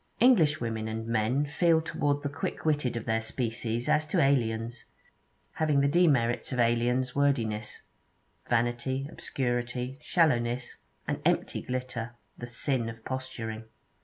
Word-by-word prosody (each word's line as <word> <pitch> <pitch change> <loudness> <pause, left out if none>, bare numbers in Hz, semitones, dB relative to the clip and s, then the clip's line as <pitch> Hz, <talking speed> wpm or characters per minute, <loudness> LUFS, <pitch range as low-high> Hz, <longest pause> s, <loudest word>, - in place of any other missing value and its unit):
English 190 - +5
women 110 -2 -3
and 110 0 -4
men 115 +5 +1
feel 160 +3 +3
toward 145 -2 -1
the - - 0
quick 140 +2 -4
witted 145 -6 +1
of 115 - -5
their 110 -1 +1
species 115 0 -2
as 155 0 +2
to - - +1
aliens, 120 -3 +1 0.7
having 150 -3 +2
the 140 - +3
demerits 140 -8 +2
of 130 - -2
aliens 120 +2 +2
wordiness, 115 -7 0 0.7
vanity, 120 +3 0
obscurity, 125 +1 -2
shallowness, 125 -8 +1 0.3
an - - -2
empty - - +1
glitter, 125 -2 -4 0.2
the 120 - -7
sin 120 0 -1
of 115 -1 -11
posturing. 115 -4 -5
125 Hz, 135 wpm, -29 LUFS, 115-140 Hz, 0.7 s, English